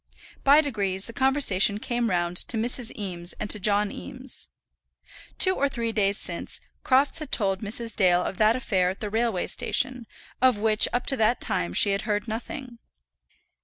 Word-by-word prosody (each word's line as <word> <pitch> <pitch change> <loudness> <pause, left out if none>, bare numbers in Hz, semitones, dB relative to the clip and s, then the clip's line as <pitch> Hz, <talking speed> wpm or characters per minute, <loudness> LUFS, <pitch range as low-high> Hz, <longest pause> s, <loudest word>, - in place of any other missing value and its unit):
By 285 +3 +6
degrees 200 -9 -2
the 230 - -9
conversation 250 -7 +2
came 240 +1 -2
round 175 -1 -1
to 225 - -1
Mrs. 235 +1 0
Eames 180 -4 -5
and 210 - -3
to 210 - +2
John 205 +1 +1
Eames. 260 0 -7 0.9
Two 375 - +7
or 280 -5 0
three 235 -4 -2
days 200 -2 +1
since, - - -5 0.2
Crofts 275 +4 +2
had 305 -3 -8
told 195 -3 0
Mrs. 225 +1 -3
Dale 180 -3 +3
of 190 - -5
that 215 +1 +4
affair 190 -8 0
at 190 - -6
the 210 -2 -5
railway 225 -4 0
station, 250 -3 -1 0.3
of 255 -4 +4
which 215 0 +2
up 245 +1 -1
to 270 - 0
that 225 +2 +2
time 85 0 -2
she 200 - +5
had 195 +1 0
heard 210 0 -2
nothing. 240 +2 -7
220 Hz, 175 wpm, -25 LUFS, 200-250 Hz, 0.9 s, Two